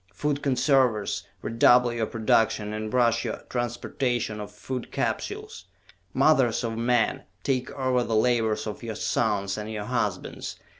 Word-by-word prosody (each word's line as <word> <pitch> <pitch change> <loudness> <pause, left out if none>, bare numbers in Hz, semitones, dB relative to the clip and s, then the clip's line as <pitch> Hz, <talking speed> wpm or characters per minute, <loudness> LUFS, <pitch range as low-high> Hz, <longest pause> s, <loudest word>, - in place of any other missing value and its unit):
"Food 145 -1 -1
Conservers, 130 -6 +2 0.2
redouble 120 +1 +4
your 115 -2 -1
production 110 -1 +1
and 110 0 -4
rush 120 -2 +3
your - - -4
transportation 120 -2 -2
of 105 0 -7
Food 125 +4 -6
Capsules! 425 +2 -3 0.5
"Mothers 130 -8 +3
of 115 -1 -2
men, 115 -1 +1 0.2
take 130 -2 0
over 130 -2 +1
the 115 - -1
labors 110 -1 +2
of 105 -2 -5
your 115 -2 -5
sons 100 -2 0
and 105 +1 -5
your 105 -1 -4
husbands! 105 -6 -3
115 Hz, 140 wpm, -26 LUFS, 110-125 Hz, 0.5 s, redouble